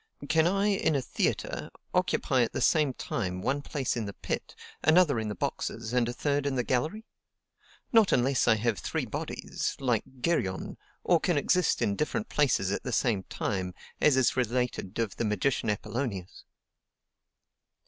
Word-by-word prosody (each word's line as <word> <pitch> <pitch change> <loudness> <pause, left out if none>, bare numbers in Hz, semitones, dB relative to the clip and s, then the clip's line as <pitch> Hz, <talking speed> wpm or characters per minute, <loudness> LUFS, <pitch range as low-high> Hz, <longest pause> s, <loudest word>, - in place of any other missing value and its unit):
Can 160 0 +4
I, 195 +2 +1
in 190 -6 +1
a 140 - +1
theatre, - - -2 0.2
occupy - - +2
at - - 0
the - - -2
same 150 -3 +3
time 95 -7 -3
one 135 +9 -1
place 140 -3 -2
in 115 -3 -2
the 100 - -7
pit, - - -4 0.3
another 155 -5 +4
in 110 - -2
the 105 - -3
boxes, 110 +5 -3
and 120 -2 +2
a - - -3
third 145 +1 0
in 140 - -1
the 125 - +1
gallery? 155 - -1 0.9
Not 225 -4 +6
unless 130 +1 +2
I 110 - +6
have 110 -1 0
three - - -2
bodies, - - -4
like 120 -5 +1 0.2
Geryon, 95 - -1 0.3
or 175 -2 +4
can 175 -1 +1
exist 180 +4 +2
in 100 - +1
different 210 - -2
places 125 -10 +2
at 100 - -1
the 125 - -4
same 110 -4 +1
time, 95 -3 -3 0.3
as 145 -3 +5
is 130 - +3
related 125 -5 -1
of 115 -4 -2
the - - -1
magician 110 +3 0
Apollonius. 105 -3 -3
125 Hz, 170 wpm, -29 LUFS, 110-150 Hz, 0.9 s, Not